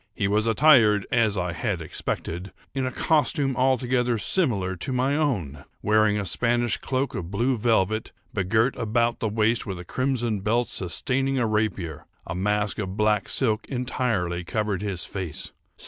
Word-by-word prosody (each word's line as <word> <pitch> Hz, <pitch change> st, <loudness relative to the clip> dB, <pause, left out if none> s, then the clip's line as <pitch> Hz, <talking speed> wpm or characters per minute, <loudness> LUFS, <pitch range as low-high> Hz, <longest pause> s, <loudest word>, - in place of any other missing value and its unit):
He 100 Hz, -, 0 dB
was 105 Hz, +3 st, +2 dB
attired, 115 Hz, -5 st, +5 dB
as 110 Hz, -4 st, +2 dB
I 90 Hz, -2 st, -1 dB
had 95 Hz, +2 st, -2 dB
expected, 85 Hz, +3 st, -4 dB, 0.2 s
in 135 Hz, -1 st, -1 dB
a -, -, -3 dB
costume 145 Hz, -3 st, +1 dB
altogether 125 Hz, -2 st, +1 dB
similar 105 Hz, -, +2 dB
to 90 Hz, -, -3 dB
my 130 Hz, +2 st, +1 dB
own; 95 Hz, -, -1 dB, 0.2 s
wearing 110 Hz, 0 st, +3 dB
a 105 Hz, -, -2 dB
Spanish 120 Hz, +5 st, +1 dB
cloak 135 Hz, +1 st, -2 dB
of 85 Hz, -2 st, -5 dB
blue 120 Hz, +7 st, +1 dB
velvet, 110 Hz, -2 st, +1 dB, 0.2 s
begirt 110 Hz, +5 st, +1 dB
about 115 Hz, +1 st, 0 dB
the 110 Hz, -, -1 dB
waist 110 Hz, +2 st, +1 dB
with 95 Hz, -2 st, -4 dB
a 90 Hz, -, -9 dB
crimson 120 Hz, -2 st, -1 dB
belt 115 Hz, +5 st, 0 dB
sustaining 135 Hz, -, -1 dB
a 120 Hz, -, +2 dB
rapier. 105 Hz, -8 st, -2 dB, 0.2 s
A 85 Hz, -, -4 dB
mask 105 Hz, +3 st, 0 dB
of 95 Hz, -1 st, -4 dB
black 105 Hz, -1 st, +1 dB
silk 110 Hz, -4 st, 0 dB
entirely 115 Hz, -9 st, -1 dB
covered 105 Hz, +1 st, -2 dB
his 100 Hz, -5 st, -3 dB
face. 95 Hz, -6 st, -5 dB
110 Hz, 160 wpm, -25 LUFS, 95-125 Hz, 0.2 s, attired